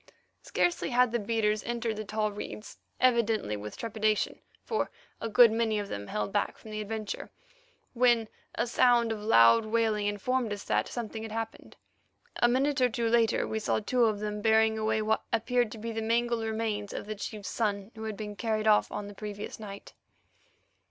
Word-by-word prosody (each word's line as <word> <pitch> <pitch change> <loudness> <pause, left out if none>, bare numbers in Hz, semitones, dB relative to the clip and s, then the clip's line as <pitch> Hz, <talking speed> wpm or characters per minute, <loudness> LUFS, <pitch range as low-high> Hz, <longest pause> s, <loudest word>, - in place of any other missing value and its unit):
Scarcely 350 -3 0
had 250 -1 +3
the 240 - 0
beaters 215 0 0
entered 235 -1 -2
the 215 - -4
tall 215 0 -1
reeds, 210 +1 -8 0.2
evidently 230 - +2
with 105 +1 -7
trepidation, 215 -2 0 0.3
for 440 - -1 0.3
a 225 - -2
good 230 +1 +7
many 225 -1 +1
of 205 -1 -3
them 100 0 -5
held 105 -2 -3
back - - 0
from 220 - -12
the 215 0 -3
adventure, 215 0 -5 0.6
when 240 -2 +3 0.3
a - - +1
sound 240 -1 +3
of 215 -1 -4
loud 210 - +6
wailing 215 -2 +1
informed 225 +3 -1
us 205 - -6
that - - 0
something 225 -2 -5
had 220 -1 -6
happened. 225 0 -6 0.6
A 240 - +4
minute 270 +3 +1
or 250 - +5
two 230 0 -1
later 230 -1 +2
we 220 - -2
saw 215 - 0
two 240 +3 +2
of 215 -2 0
them 210 0 -3
bearing 220 0 +4
away 220 0 0
what 220 +1 +1
appeared 240 0 +1
to - - -8
be 230 +2 -5
the 225 0 -3
mangled 235 +1 +1
remains 220 -2 -2
of - - -5
the 215 - -4
chief's 210 -1 -6
son 205 -2 -2
who 220 0 -7
had 215 -2 -4
been 210 -1 -6
carried 220 -1 -1
off 215 -1 +4
on 205 - -4
the 205 - -9
previous 205 +1 -7
night. 200 -2 -9
220 Hz, 190 wpm, -29 LUFS, 210-230 Hz, 0.6 s, good